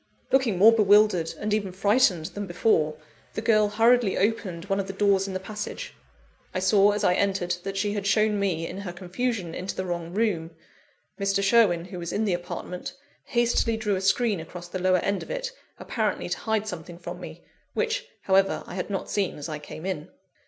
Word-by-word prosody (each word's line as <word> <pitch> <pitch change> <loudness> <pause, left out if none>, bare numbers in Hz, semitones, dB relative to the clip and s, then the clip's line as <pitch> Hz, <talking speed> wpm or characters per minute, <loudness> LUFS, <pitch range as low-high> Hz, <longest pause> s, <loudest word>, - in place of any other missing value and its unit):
Looking 260 -8 +3
more 215 +5 +8
bewildered, 205 -5 +4
and 210 0 -2
even 200 -3 0
frightened, 195 - +3
than 205 -1 -4
before, 160 -4 +1 0.4
the - - -2
girl 215 -2 +4
hurriedly 225 0 +3
opened 195 -4 -1
one 195 0 0
of 195 - -2
the 195 - -5
doors 200 -1 +2
in 190 - -5
the - - -1
passage. 215 - -6 0.6
I - - +1
saw, 200 +2 +4
as 210 0 -2
I 180 - +4
entered, 180 -2 0
that 195 +1 -5
she 205 +1 0
had 200 -1 -2
shown 215 0 +3
me, 175 -5 0
in 190 - -6
her 190 -3 -6
confusion, 185 0 -3
into 185 +2 -4
the 185 - -3
wrong 170 -2 -4
room. 175 -6 -1 0.6
Mr. 195 0 +1
Sherwin, 195 -5 +4
who 180 -1 -8
was 170 -1 -4
in 220 - 0
the 195 - +1
apartment, 175 0 -5 0.3
hastily 235 -2 +1
drew 210 -2 0
a 185 - -2
screen 200 +1 +2
across 175 +2 -8
the 185 +2 -5
lower 185 0 +4
end 200 +2 -1
of - - -9
it, - - -3 0.3
apparently - - -2
to - - -1
hide 220 -1 0
something 175 -3 -7
from 175 - -7
me; - - -9 0.3
which, 475 +1 -1 0.2
however, 195 0 +2
I - - -9
had 185 +2 -4
not 195 -2 -3
seen 200 -3 0
as 145 - -6
I 155 -1 -4
came 155 +3 -9
in. 180 -3 -3
195 Hz, 200 wpm, -26 LUFS, 180-215 Hz, 0.6 s, more